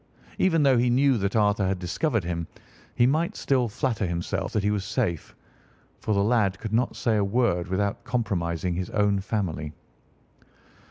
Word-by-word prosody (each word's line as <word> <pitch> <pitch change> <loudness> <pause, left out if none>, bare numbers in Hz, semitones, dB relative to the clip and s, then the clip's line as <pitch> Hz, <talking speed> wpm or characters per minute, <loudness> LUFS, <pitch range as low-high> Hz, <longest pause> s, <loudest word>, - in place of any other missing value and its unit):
Even 165 -5 +3
though 135 -3 +4
he 120 +1 +2
knew 135 +2 +3
that 100 +1 -1
Arthur 105 -2 +2
had 95 0 0
discovered 110 - -1
him, 85 -1 -3 0.5
he 120 - +4
might 155 +6 +1
still 130 -3 +1
flatter 110 -2 -1
himself 85 0 -3
that 105 - -1
he 105 - +2
was 105 -2 -1
safe, 85 -4 -2 0.6
for 110 - -1
the 100 - +2
lad 105 -4 +2
could 110 +1 -6
not 120 +3 +1
say 110 -3 +1
a 105 - +2
word 100 -4 +1
without 100 +2 -1
compromising 95 -8 -1
his 90 +1 -3
own 105 -2 +1
family. 90 -7 -3
105 Hz, 170 wpm, -26 LUFS, 95-120 Hz, 0.6 s, though